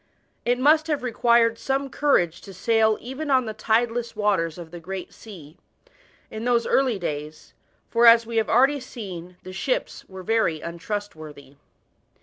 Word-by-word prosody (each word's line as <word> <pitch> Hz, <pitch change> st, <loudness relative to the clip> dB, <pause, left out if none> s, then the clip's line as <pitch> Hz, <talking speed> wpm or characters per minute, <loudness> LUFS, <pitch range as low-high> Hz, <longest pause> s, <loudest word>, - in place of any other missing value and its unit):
It 245 Hz, +1 st, +2 dB
must 305 Hz, +4 st, +4 dB
have 300 Hz, -4 st, -1 dB
required 235 Hz, -1 st, +2 dB
some 275 Hz, +1 st, -1 dB
courage 255 Hz, -, +1 dB
to 195 Hz, -, -12 dB
sail 220 Hz, +2 st, +2 dB
even 265 Hz, +5 st, -6 dB
on 260 Hz, -2 st, +3 dB
the 220 Hz, -, -4 dB
tideless 230 Hz, +2 st, 0 dB
waters 195 Hz, -6 st, 0 dB
of 170 Hz, -2 st, -10 dB
the 175 Hz, -, -8 dB
Great 185 Hz, +2 st, -7 dB
Sea, 175 Hz, -8 st, -13 dB, 0.7 s
in 220 Hz, -, -6 dB
those 240 Hz, -1 st, +2 dB
early 260 Hz, -5 st, +2 dB
days, 150 Hz, -3 st, -6 dB, 0.4 s
for, 235 Hz, 0 st, +5 dB
as 230 Hz, 0 st, +7 dB
we 230 Hz, 0 st, -4 dB
have 220 Hz, -, +1 dB
already 270 Hz, +5 st, +4 dB
seen, 180 Hz, -8 st, -9 dB
the 185 Hz, -, -9 dB
ships -, -, -2 dB
were 190 Hz, -1 st, -9 dB
very 220 Hz, -6 st, +1 dB
untrustworthy. 160 Hz, -5 st, -7 dB
220 Hz, 155 wpm, -24 LUFS, 175-245 Hz, 0.7 s, as